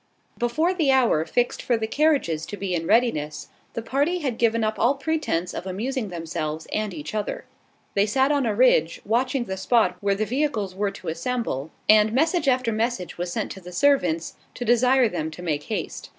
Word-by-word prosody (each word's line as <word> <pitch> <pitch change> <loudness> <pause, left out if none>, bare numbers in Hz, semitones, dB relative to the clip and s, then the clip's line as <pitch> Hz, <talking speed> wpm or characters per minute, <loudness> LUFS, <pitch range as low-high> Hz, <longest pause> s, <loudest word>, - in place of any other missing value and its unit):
Before 310 +10 +1
the 320 -6 +1
hour 240 -12 +3
fixed 245 +8 0
for 240 - +1
the 220 - -2
carriages 245 - +1
to 205 - -6
be 195 -2 -3
in 165 -1 -2
readiness, 210 -11 +1 0.3
the 230 - -3
party 285 +9 0
had 265 -9 -3
given 230 -1 +2
up 215 0 -1
all 245 +5 +3
pretence 275 - -1
of 185 - -5
amusing 220 +4 -3
themselves 160 -2 -4
and 215 -1 -1
each 150 -1 -7
other. 210 -1 -3 0.5
They 200 +1 +2
sat 265 +6 +2
on 280 -4 +1
a 215 - 0
ridge, 200 -9 +3
watching 245 +4 +1
the 190 -4 -5
spot 190 -3 +2
where 200 -1 +1
the 215 +2 -1
vehicles 235 -7 -1
were 200 +2 -1
to 185 -3 -7
assemble; 165 - -3 0.2
and 215 0 +5
message 320 +4 +2
after 255 -3 +2
message 220 -5 -2
was 175 0 -2
sent - - -3
to 190 - -8
the 180 0 -10
servants, 180 - +2 0.2
to 245 - -4
desire 250 +2 +4
them 165 -6 -3
to 165 +3 -10
make 150 -4 -2
haste. - - -4
220 Hz, 195 wpm, -24 LUFS, 180-255 Hz, 0.5 s, and